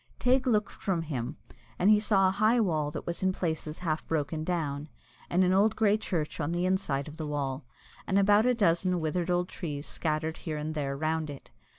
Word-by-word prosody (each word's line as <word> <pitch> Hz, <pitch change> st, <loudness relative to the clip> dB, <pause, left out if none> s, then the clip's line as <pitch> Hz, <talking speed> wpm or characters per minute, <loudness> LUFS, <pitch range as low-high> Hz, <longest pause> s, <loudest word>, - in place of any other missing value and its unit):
Teig 260 Hz, +1 st, +2 dB
looked 210 Hz, -4 st, +2 dB
from 180 Hz, -4 st, -2 dB
him, 140 Hz, -2 st, -4 dB, 0.4 s
and 195 Hz, +4 st, +4 dB
he 210 Hz, -, +6 dB
saw 200 Hz, -3 st, +3 dB
a -, -, +2 dB
high 215 Hz, +5 st, +3 dB
wall 155 Hz, -8 st, +1 dB
that -, -, -6 dB
was 170 Hz, -, -3 dB
in 190 Hz, 0 st, +2 dB
places 160 Hz, -4 st, -3 dB
half 155 Hz, -1 st, 0 dB
broken 155 Hz, 0 st, -1 dB
down, 155 Hz, -4 st, -2 dB, 0.4 s
and 180 Hz, +2 st, +3 dB
an 185 Hz, 0 st, +3 dB
old 200 Hz, +3 st, +4 dB
grey 210 Hz, -2 st, +3 dB
church 175 Hz, -9 st, -3 dB
on 160 Hz, +2 st, -1 dB
the 175 Hz, +1 st, 0 dB
inside 160 Hz, -7 st, 0 dB
of 150 Hz, +1 st, -9 dB
the 155 Hz, -2 st, -4 dB
wall, 140 Hz, -2 st, -3 dB, 0.4 s
and 195 Hz, -, +2 dB
about 205 Hz, +3 st, +5 dB
a 250 Hz, -, +3 dB
dozen 180 Hz, -3 st, +2 dB
withered 170 Hz, +2 st, -1 dB
old 180 Hz, 0 st, +1 dB
trees 150 Hz, -5 st, -5 dB
scattered 160 Hz, 0 st, -2 dB
here 155 Hz, -2 st, -4 dB
and 150 Hz, +1 st, -3 dB
there 140 Hz, -3 st, -2 dB
round 155 Hz, +1 st, -1 dB
it. 140 Hz, -2 st, -10 dB
165 Hz, 210 wpm, -29 LUFS, 150-190 Hz, 0.4 s, he